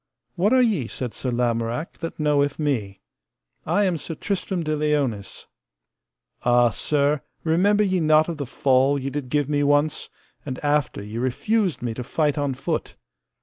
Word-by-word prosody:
What 190 +4 +2
are 255 -1 +5
ye, 195 - +1
said 125 -1 -5
Sir 130 - -3
Lamorak, 120 +3 -1
that 165 -1 -6
knoweth 145 -1 +2
me? 110 -11 -2 0.7
I 205 - +2
am 175 -4 0
Sir 165 - -6
Tristram 190 -2 -2
de 155 -1 -1
Liones. 145 -9 -1 1.0
Ah, 120 -1 +4
sir, 145 +3 +1 0.2
remember 195 +6 +3
ye 190 -2 +1
not 155 -1 +4
of 170 -2 -4
the 140 -3 -4
fall 135 +2 +2
ye 135 +1 -4
did 140 -2 -4
give 145 0 +1
me 145 -1 +1
once, 145 +1 +1 0.3
and 130 -3 -5
after 145 -7 0
ye 105 +3 -6
refused 180 - 0
me 120 -2 -2
to 125 - -5
fight 150 +3 0
on 140 -2 -1
foot. - - -3
145 Hz, 165 wpm, -23 LUFS, 125-160 Hz, 1.0 s, are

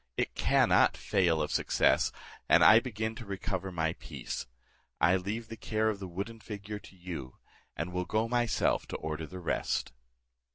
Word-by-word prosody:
It - - 0
cannot - - +4
fail 85 -6 +2
of 75 - -3
success, - - +3 0.4
and - - +7
I 110 - +9
begin 110 -3 -3
to 120 - -7
recover 95 -1 -3
my 80 -2 0
peace. - - -6 0.5
I 90 - +5
leave 105 +5 -3
the 115 - -7
care 110 0 0
of 100 - -7
the 95 - -6
wooden 100 +6 -5
figure 105 -1 -6
to 95 - -15
you, 85 -8 -7 0.4
and 85 +3 -3
will 90 0 -1
go 110 +5 0
myself 120 -1 +1
to - - -5
order 80 0 -4
the 95 - -9
rest." 90 -7 -1
95 Hz, 170 wpm, -31 LUFS, 85-110 Hz, 0.5 s, I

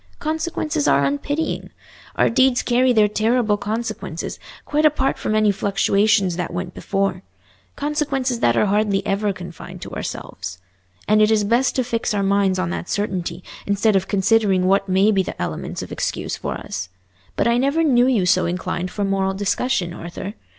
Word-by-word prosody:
Consequences 310 -1 -2
are 140 - +4
unpitying. 285 - -2 0.5
Our - - +3
deeds 260 +1 +3
carry 255 +1 +3
their 215 -3 +4
terrible 220 +1 +1
consequences, 220 +3 -4 0.3
quite 300 +1 0
apart 295 -3 +2
from 215 - -1
any 215 -1 +4
fluctuations 200 -1 +2
that 180 - -3
went 175 0 -4
before—consequences 255 - -3
that 120 - +2
are - - +4
hardly 205 -1 +1
ever 205 0 0
confined 175 -3 -9
to - - -8
ourselves. 90 0 -6 0.5
And 215 +1 +4
it 215 - +5
is 220 -1 +3
best 235 +5 +2
to 255 - +1
fix 230 -3 -1
our 200 - +1
minds 195 -1 +2
on 180 -2 -1
that 175 - -5
certainty, 185 -4 -2 0.2
instead 200 +1 +2
of 190 0 +1
considering 200 -2 +2
what 195 +1 +2
may 190 +3 +4
be 195 -2 +3
the 185 - -6
elements - - -4
of - - -10
excuse - - -3
for - - -4
us. - - -6 0.5
But - - +1
I 235 +1 +3
never 280 +5 +2
knew 250 -5 +4
you 230 -8 +2
so 180 - +3
inclined 180 +1 -3
for 205 - -3
moral 195 -1 0
discussion, 200 -2 0
Arthur? 175 +4 -7
205 Hz, 170 wpm, -21 LUFS, 190-245 Hz, 0.5 s, it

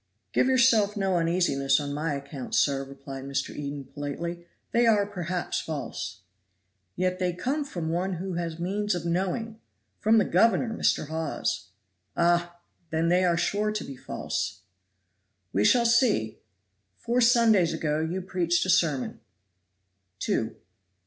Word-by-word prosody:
"Give - - +3
yourself 235 -5 +4
no 190 -2 +1
uneasiness 165 -5 +2
on 145 -1 -4
my 150 0 -1
account, 140 -2 -6
sir," 135 -1 +2
replied 135 0 -9
Mr. 140 0 -3
Eden 145 -1 -5
politely, 170 +5 -5 0.2
"they 235 0 +3
are 210 -3 +4
perhaps 180 -3 -3
false." 140 -9 -5 0.7
"Yet 185 0 0
they 180 -1 0
come 270 - -1
from 175 - -4
one 180 +3 -1
who 185 +2 -4
has 170 -2 -3
means 200 +3 -1
of 175 -1 -4
knowing 195 +6 -2 0.4
from 220 +1 +4
the 210 - +4
governor, 230 +6 +3
Mr. 155 - +1
Hawes." 160 - -2 0.5
"Ah! 175 0 +2 0.3
then 160 +1 +1
they 180 +1 +4
are 175 -2 +3
sure 210 +4 0
to 215 0 -3
be 135 - -8
false." - - -4 0.9
"We 100 - +2
shall 235 - +5
see. 230 - +2 0.6
Four 245 +2 0
Sundays 230 -7 +5
ago 155 -2 -1
you 170 +4 -2
preached 175 -2 +1
a 185 - +2
sermon." 155 -8 +1 1.0
"Two." 110 +3 -1
175 Hz, 140 wpm, -27 LUFS, 150-205 Hz, 1.0 s, shall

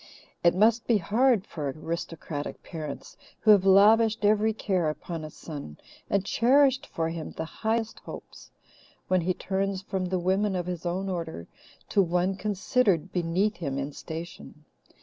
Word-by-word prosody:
It 170 0 +5
must 220 +4 +3
be 230 - +4
hard 220 +3 +2
for 150 -4 -4
aristocratic 160 0 -5
parents 155 -4 -7 0.3
who 215 - +6
have 195 -2 +5
lavished 215 +3 +5
every 215 +1 +4
care 190 -6 0
upon 160 +1 -5
a 155 - -6
son, 145 - -9 0.3
and 200 -1 +1
cherished 265 +4 +3
for 165 0 -2
him 165 -1 -6
the 160 - -4
highest 220 +6 -2
hopes, - - -11 0.6
when 185 -1 +3
he 180 +2 0
turns 195 0 -2
from 190 -1 -2
the 185 +1 -1
women 190 +3 +1
of 175 -1 -2
his 180 -1 -4
own 185 +3 -2
order 165 - -4 0.4
to 200 - +4
one 180 +1 +1
considered 200 -2 0
beneath 180 +4 0
him 140 -5 -3
in 140 +1 -3
station. 160 -2 -8
185 Hz, 155 wpm, -27 LUFS, 165-210 Hz, 0.6 s, who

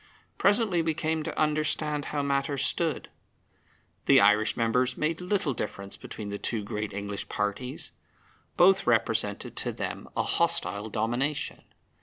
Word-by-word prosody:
Presently 200 -3 +3
we 160 -1 0
came 160 0 0
to - - -4
understand 150 -1 0
how 145 -1 -2
matters 140 0 0
stood. 165 -4 -1 1.0
The - - +8
Irish 105 +2 +4
members 125 +2 +1
made 160 +3 -1
little 180 -5 0
difference 100 -3 -5
between 105 -2 -7
the 100 0 -4
two 110 -3 -2
great 105 +1 -3
English 100 0 -5
parties. 105 +6 -3 0.7
Both 190 -2 +5
represented 110 -2 +1
to - - -1
them - - -5
a - - +3
hostile 105 +2 0
domination. 120 +7 -1
130 Hz, 135 wpm, -28 LUFS, 105-155 Hz, 1.0 s, The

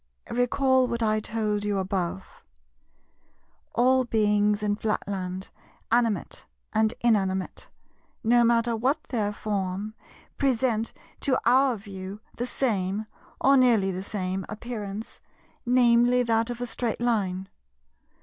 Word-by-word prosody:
Recall 260 +1 +3
what 235 -1 -2
I 215 -1 +2
told 215 -1 -2
you 205 -1 0
above. 190 -1 -3 1.3
All 255 +2 +4
beings 210 -2 +2
in 205 0 +1
Flatland, 195 -3 -3 0.4
animate 230 -5 0 0.3
and 220 0 +3
inanimate, 190 -5 0 0.5
no 240 +2 +5
matter 235 0 +3
what 255 +7 0
their 215 -5 0
form, 205 0 -3 0.5
present 240 -4 +1 0.3
to 265 -2 +1
our 255 0 +4
view 195 -1 -8 0.2
the 245 - -2
same, 210 -5 -1 0.3
or 275 +1 +5
nearly 235 -7 +4
the 185 0 -4
same, 190 -1 -3
appearance, 215 -1 -6 0.5
viz. 245 0 +4
that 225 0 +1
of 240 0 -5
a - - 0
straight 235 -1 -3
Line. 195 -6 0
220 Hz, 115 wpm, -26 LUFS, 200-240 Hz, 1.3 s, no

